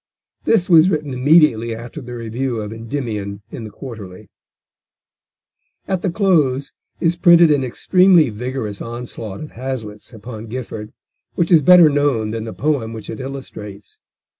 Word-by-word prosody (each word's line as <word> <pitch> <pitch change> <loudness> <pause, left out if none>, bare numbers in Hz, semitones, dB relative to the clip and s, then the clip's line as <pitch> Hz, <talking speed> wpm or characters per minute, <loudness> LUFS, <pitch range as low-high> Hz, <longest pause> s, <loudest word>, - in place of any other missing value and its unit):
This 205 -6 +2
was 170 0 +6
written 150 -6 -2
immediately 125 -4 +3
after 120 +7 -9
the 125 -1 -8
review 120 +1 -3
of 105 0 -5
Endymion 110 -4 -5
in 115 - -7
the - - -7
Quarterly. 105 -6 -10 1.6
At 190 -2 -1
the 190 - 0
close 155 -9 +1 0.3
is 170 0 +1
printed 170 -2 +6
an 145 -2 +2
extremely 175 +3 +3
vigorous 110 -2 -5
onslaught 115 -4 -7
of 155 - -8
Hazlitt's 115 -4 -6
upon 110 0 -9
Gifford, 110 -3 -7 0.4
which 170 -1 0
is 165 -3 +7
better 180 +2 +7
known 140 -7 +1
than 115 0 -4
the 110 - -6
poem 135 -7 -1
which 110 -1 -8
it 110 - -7
illustrates. 120 -7 -9
125 Hz, 145 wpm, -19 LUFS, 110-155 Hz, 1.6 s, is